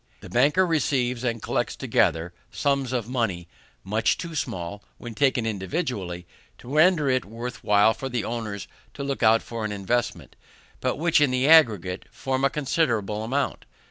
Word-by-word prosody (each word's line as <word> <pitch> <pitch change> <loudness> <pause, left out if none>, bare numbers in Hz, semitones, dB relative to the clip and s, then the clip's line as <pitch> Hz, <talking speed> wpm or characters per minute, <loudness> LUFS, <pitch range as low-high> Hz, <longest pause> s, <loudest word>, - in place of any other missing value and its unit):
The - - -11
banker 145 +10 +4
receives 130 -7 0
and 115 -3 -2
collects - - -1
together 80 +2 +1 0.2
sums 140 -3 0
of 120 -4 -2
money 110 -9 -2 0.4
much 110 +3 +1
too 170 -2 -6
small, 100 - -4
when 120 -1 -8
taken 130 -1 +1
individually, 100 - -3 0.3
to 125 - -9
render 155 -1 +4
it 130 -1 +2
worth 115 +2 -7
while 105 +2 +4
for 135 - -6
the 120 -3 -2
owners 110 -4 -4 0.3
to 140 - -5
look 140 0 -3
out 115 0 +5
for 115 -2 -5
an 110 - -2
investment, 105 +5 -2 0.4
but 130 - -1
which 160 +1 +2
in 145 - +4
the 130 +2 +1
aggregate 105 - +4
form 130 0 -3
a 140 - +4
considerable 120 -8 0
amount. 135 +5 -2
120 Hz, 165 wpm, -25 LUFS, 105-140 Hz, 0.4 s, out